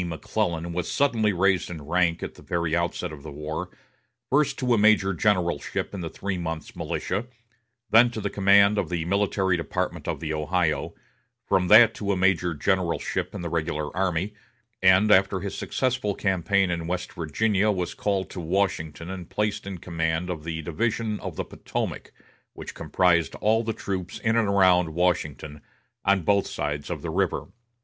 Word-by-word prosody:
McClellan 85 0 -2
was 90 0 -2
suddenly 115 -7 +2
raised 95 0 +1
in 80 -4 -7
rank, 85 +2 +1
at - - -5
the - - -16
very 85 -1 -1
outset 85 -2 -2
of 75 - -10
the 75 - -9
war, 75 +2 -5 0.6
first 140 0 +2
to 125 -2 +1
a - - +3
major 105 -2 +4
generalship 90 -4 0
in 100 - -5
the 85 - -4
three 95 +1 -4
months' 80 -2 -5
militia, 105 +6 -3 0.6
then 120 +2 +7
to 115 - -6
the - - -3
command 100 +1 +5
of - - -2
the 85 -2 -2
military 95 0 +1
department 85 - -3
of - - -2
the 80 -1 -3
Ohio; 80 +1 -1 0.5
from 90 -1 +2
that 110 +3 +8
to 100 -2 -2
a 95 - 0
major 90 -2 +2
generalship 90 +2 -1
in - - -5
the 85 - -3
regular 75 -2 -2
army; 95 +1 -1 0.5
and 95 +3 +5
after 95 0 +4
his 100 +1 -5
successful 125 -6 -1
campaign 95 0 +1
in 85 -1 -3
West 90 +1 -3
Virginia 100 +6 +1
was 90 -4 -1
called 95 -3 -1
to 95 - -8
Washington 85 -3 -1
and 90 -2 -7
placed 105 -1 -2
in 95 -2 -5
command 85 +1 -2
of 80 -4 -6
the 80 0 -4
Division 110 +6 -1
of - - -6
the - - -3
Potomac, - - -5 0.4
which - - -8
comprised 85 -4 +1
all 110 +2 +2
the 115 - -1
troops 95 -4 -4
in 115 0 0
and 115 -2 +2
around 90 -4 +3
Washington, 80 -4 -1 0.4
on 100 -2 +2
both 100 +3 +2
sides 75 0 -3
of - - -5
the 85 - -3
river. 95 +1 -1
90 Hz, 175 wpm, -25 LUFS, 85-100 Hz, 0.6 s, that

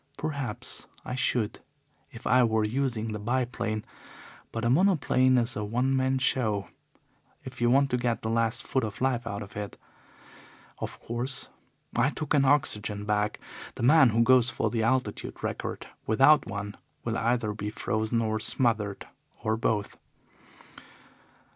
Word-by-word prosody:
Perhaps 140 -8 -4 0.2
I 125 - -4
should 125 -4 0 0.5
if - - -12
I 125 +1 +5
were 110 -2 +2
using 115 -2 -1
the 105 - -4
biplane, 115 -1 -2 0.7
but 115 0 -3
a - - +3
monoplane 135 -6 +4
is 120 0 0
a 105 - -2
one 125 +6 0
man 130 0 +2
show 110 -7 0 0.7
if 130 -1 -9
you 120 - +4
want 135 +2 +4
to 125 - +2
get 120 -2 -1
the 110 - -1
last 115 0 0
foot 130 - 0
of 105 -2 -4
life 125 -3 0
out 100 -1 -4
of 100 - -13
it. 105 -1 -5 1.0
Of - - -5
course, 120 +3 -4 0.5
I 125 +4 +3
took 150 0 -3
an 140 -2 +4
oxygen 105 -8 +1
bag; 105 0 0 0.4
the - - -5
man 135 +1 +7
who 115 +1 +3
goes 125 0 +5
for 110 -4 -1
the 115 -1 0
altitude 115 -2 -1
record - - -4 0.2
without 135 +7 +5
one 100 0 -5 0.3
will 115 -1 -1
either 115 -2 0
be 105 0 -4
frozen 110 +2 -1
or 110 0 -1
smothered 110 -3 +1 0.4
or 110 0 +1
both. 110 -2 -1
115 Hz, 155 wpm, -28 LUFS, 110-130 Hz, 1.0 s, man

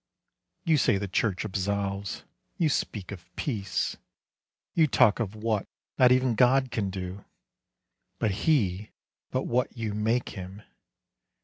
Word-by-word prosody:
You 160 -3 +3
say 105 - +3
the 100 +1 -3
church 95 0 0
absolves, 100 0 -2 0.3
you 165 -3 +3
speak 105 -8 -2
of 90 -3 -9
peace; 105 -9 -2 0.8
You 160 -2 +4
talk 115 -3 +4
of 110 -3 -2
what 110 -2 -1 0.3
not 125 -1 +7
even 130 -1 +4
God 130 +3 +4
can 105 -4 -1
do, 95 +1 -6 0.9
Be 110 - +1
He 105 - +1 0.4
but - - -1
what 125 +1 0
you 110 -2 -2
make 110 +4 0
Him. 95 +2 -8
105 Hz, 130 wpm, -28 LUFS, 100-125 Hz, 0.9 s, not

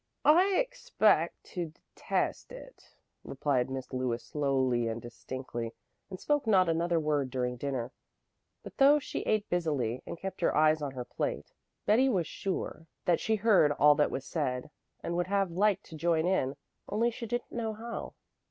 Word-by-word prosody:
"I 365 +6 +6
expect - - +1
to 175 -3 -2 0.3
detest - - -2
it," - - -13 0.3
replied 130 -3 0
Miss 130 0 -6
Lewis 125 -2 -1
slowly 130 -5 +1
and 115 0 -3
distinctly, 120 -1 -6 0.3
and 185 -2 -7
spoke 290 -5 0
not 190 -4 +5
another 170 +1 +1
word 150 -3 0
during 125 -1 -2
dinner. 130 -2 -3 0.7
But - - -11
though 280 +1 +7
she 290 - -4
ate 215 -1 0
busily 145 -9 -1
and - - -5
kept 195 +2 -6
her - - +2
eyes 155 0 +4
on 140 -2 -3
her 125 -2 -5
plate, - - -4 0.3
Betty 250 +6 +4
was 185 -9 +1
sure 170 -3 -4 0.2
that 175 -2 +3
she 220 - +1
heard 200 -8 +4
all 150 +1 +6
that 145 0 +2
was 135 - -4
said, 130 -4 -2 0.3
and 170 - -2
would 175 +1 0
have 195 -2 +1
liked 200 +3 +2
to - - -7
join 165 0 +1
in, 145 -7 +1 0.3
only 230 +3 +1
she 230 0 -6
didn't 240 +2 -3
know 225 -2 -2
how. 230 +2 -6
165 Hz, 170 wpm, -30 LUFS, 130-215 Hz, 0.7 s, though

